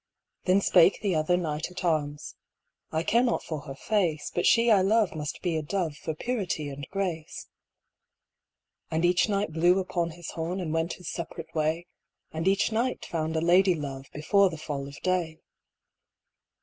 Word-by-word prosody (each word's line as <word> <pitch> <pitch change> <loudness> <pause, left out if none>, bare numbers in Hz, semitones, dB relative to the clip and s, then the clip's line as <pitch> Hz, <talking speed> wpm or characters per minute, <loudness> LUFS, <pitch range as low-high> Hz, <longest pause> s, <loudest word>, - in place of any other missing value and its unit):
Then 190 +2 +4
spake 180 -1 +5
the 200 -3 0
other 160 +3 +2
knight 160 -2 -2
at 180 0 -6
arms: 150 -3 -1 0.6
"I 160 +1 0
care 235 +6 +3
not 245 -1 +1
for 155 -2 -4
her 135 - -6
face, 175 -3 0
But 175 - +1
she 230 0 +5
I 200 -3 +6
love 210 +1 +3
must 150 -2 -5
be 175 -3 0
a 155 - 0
dove 165 -1 -2
For 155 +1 -5
purity 185 -9 -2
and 140 0 -7
grace." 180 -5 -3 1.4
And 160 +2 +1
each 175 +4 +3
knight 200 -5 0
blew 175 +3 +4
upon 175 -3 -1
his 170 0 -8
horn 170 +3 -3
And 165 -4 -3
went 165 +1 0
his 180 - -10
separate 165 -1 -7
way, 160 +2 0 0.5
And 160 +2 -3
each 195 +3 +3
knight 235 +4 -1
found 160 -1 -2
a 160 - +1
lady 180 +2 +4
love 140 -3 -6
Before 195 +6 +3
the 160 - -7
fall 145 -3 -4
of 140 +1 -10
day. 175 -4 -1
170 Hz, 175 wpm, -27 LUFS, 155-190 Hz, 1.4 s, I